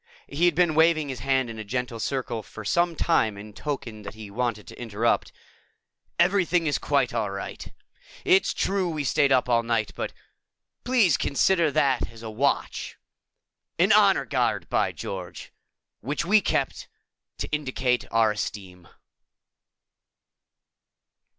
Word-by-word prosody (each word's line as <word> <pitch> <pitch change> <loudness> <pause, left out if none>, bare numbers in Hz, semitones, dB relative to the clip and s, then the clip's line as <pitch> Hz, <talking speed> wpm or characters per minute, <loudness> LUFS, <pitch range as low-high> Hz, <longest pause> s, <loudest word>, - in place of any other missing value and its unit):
He 160 +5 0
had 175 -3 +3
been 175 -2 +3
waving 160 -2 +3
his 130 -3 -5
hand 130 0 +1
in 115 -1 -7
a - - -4
gentle 120 +2 -3
circle 120 -2 -2
for 110 +1 -11
some 170 +8 +1
time 110 -12 +1
in 105 +1 -10
token 120 -5 -5
that 105 +1 -9
he 110 -2 -10
wanted 115 -2 -2
to - - -11
interrupt. 115 0 0 0.9
"Everything 180 -1 +2
is 145 - 0
quite - - +1
all - - -1
right. - - -7 0.5
It's 380 +1 +4
true 190 -2 0
we 155 -3 -3
stayed 140 0 +2
up 130 -1 +3
all 120 -1 +3
night, 115 -2 -1
but - - -4 0.7
please 240 - +3
consider 170 +3 +2
that 130 -4 +1
as 115 0 -13
a 110 - -6
watch 135 +6 -1 0.8
an - - +4
honor - - +5
guard, - - 0
by - - +2
George! 90 -2 -7 0.5
which 145 +8 -3
we 210 +4 +5
kept - - -1 0.5
to - - -3
indicate 130 -4 -1
our 115 -1 +3
esteem." 95 -4 -6
130 Hz, 145 wpm, -25 LUFS, 110-160 Hz, 0.9 s, honor